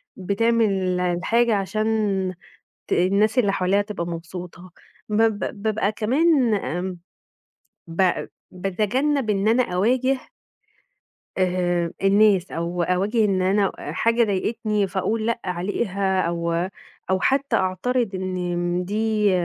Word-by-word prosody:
بتعمل 200 -2 +1
الحاجة 210 +6 +1
عشان 205 +2 -1 1.0
ت - - -1
الناس 200 +6 +2
اللي 205 -5 +3
حواليها 190 +2 +2
تبقى 205 -4 -4
مبسوطة، 175 +2 -8 0.4
بب 215 0 +2 0.2
بابقى 215 -2 +1
كمان 255 +3 +2
آمم، 180 -2 -3 0.9
ب 175 +2 0 0.2
باتجنب 220 +8 0
إن 200 0 +1
أنا 235 +3 +4
أواجه 250 +8 +1 1.2
آآ 175 -2 0
الناس، 195 -1 +4
أو 170 +1 -2
أواجه 200 +6 +1
إن 190 -3 +1
أنا 195 +1 +2
حاجة 230 +10 +1
ضايقتني 210 +1 -1
فاقول 215 +4 -1
لأ 235 0 -1
عليها، 190 +1 -1
أو 170 0 -1 0.6
أو 190 0 +2
حتى 275 +4 +1
أعترض 205 +4 0
إن 180 -1 -2
دي 210 +1 +1
195 Hz, 110 wpm, -23 LUFS, 180-220 Hz, 1.2 s, أنا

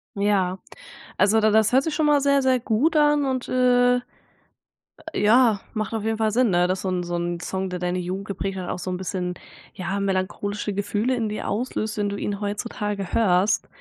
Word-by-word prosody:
Ja, 195 -2 +1 0.6
also 205 +3 +4
da 215 0 +3
das 220 +1 +4
hört 265 +2 +4
sich 310 -1 -2
schon 310 -1 +1
mal 295 -1 +4
sehr, 280 0 +3
sehr 260 -1 +2
gut 250 +8 +1
an 295 -1 +3
und, 260 -2 -2
äh, 245 -1 +3 1.1
ja, 220 -1 +4
macht 215 -1 -3
auf 220 -2 -2
jeden 220 0 -1
Fall 220 -1 +1
Sinn, 245 +1 +3
ne, 175 0 +3
dass 185 0 -1
so 190 - -2
'n 180 -1 -1
so 175 0 -4
'n 175 0 -2
Song, 190 0 -3
der 180 -1 -4
deine 180 0 -1
Jugend 185 +2 -4
geprägt 195 0 -4
hat 180 -1 -5
auch - - -3
so 185 - -5
'n 180 - -2
bisschen, 180 -1 -3 0.4
ja, 195 +2 -3
melancholische 200 +1 -2
Gefühle 210 +5 -1
in 225 -3 -1
dir 215 - -4
auslöst, 215 -1 -2
wenn 205 -1 0
du 200 - -4
ihn 200 0 -3
heutzutage 205 -1 -4
hörst, 195 -2 +2
205 Hz, 205 wpm, -23 LUFS, 190-245 Hz, 1.1 s, also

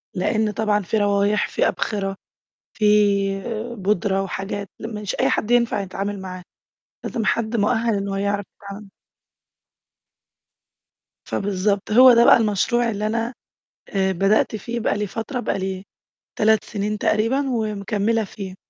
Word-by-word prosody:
لإن 215 +3 0
طبعًا 210 0 +1
في 210 +4 -1
روايح، 205 0 +2
في - - +1
أبخرة، 195 -3 -2 0.6
في 215 - -3 0.9
بودرة 195 -1 0
وحاجات 195 +1 -5
مش 210 -3 -5
أي - - +3
حد 215 - -1
ينفع 235 -3 +2
يتعامل 195 +1 -4
معاها، 185 -1 -8 0.6
لازم 225 -3 -3
حد 230 +1 0
مؤهل 225 +1 +1
إنه 195 0 -2
يعرف 200 0 -1
يتعامل 200 0 -10 2.3
فبالضبط، 200 +1 -1
هو 250 +3 +8
ده 235 0 +5
بقى - - +8
المشروع 230 +2 +1
اللي 210 -1 -2
أنا، 230 +2 -2 0.6
آآ، 190 -1 +1
بدأت 195 +4 +2
فيه 235 +3 -4
بقى 215 - 0
لي 210 0 -2
فترة، 225 +6 -4
بقى 220 - -2
لي 190 0 -4 0.5
3 220 -1 +3
سنين 210 0 -3
تقريبًا 235 +7 +1
ومكملة 215 -1 -1
فيه. 195 -2 -8
210 Hz, 130 wpm, -22 LUFS, 195-225 Hz, 2.3 s, هو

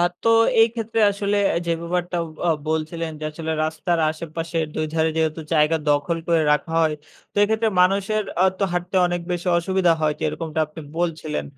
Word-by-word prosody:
আর 175 0 +3
তো 230 - +2 0.3
এই 225 - +8
ক্ষেত্রে 225 -1 -2
আসলে 200 0 -1
অ্যা - - +1
যে, 170 - 0
ব্যাপারটা 175 +1 -2 0.3
আ - - +2 0.2
বলছিলেন 160 +1 -2
যে, - - -5
আসলে 160 0 -4
রাস্তার 165 +2 -1
আশেপাশের 165 +1 -3
২ 155 - -1
ধারে 160 0 +2
যেহেতু 160 0 0
জায়গা 155 +1 +4
দখল 145 +3 +1
করে 165 -2 +3
রাখা 160 +2 -1
হয়। 155 -1 +2 0.4
তো - - -32
এক্ষেত্রে 220 +1 +2
মানুষের 200 +3 +2 0.2
আ - - +6 0.2
তো - - -2
হাঁটতে 180 +1 -2
অনেক 175 0 -2
বেশি 175 +1 -4
অসুবিধা 180 0 +2
হয় 155 -1 +2
যে, - - -8
এরকমটা 160 0 -3
আপনি 155 +2 -11 0.2
বলছিলেন। 160 -3 -2
170 Hz, 185 wpm, -22 LUFS, 160-180 Hz, 0.4 s, এই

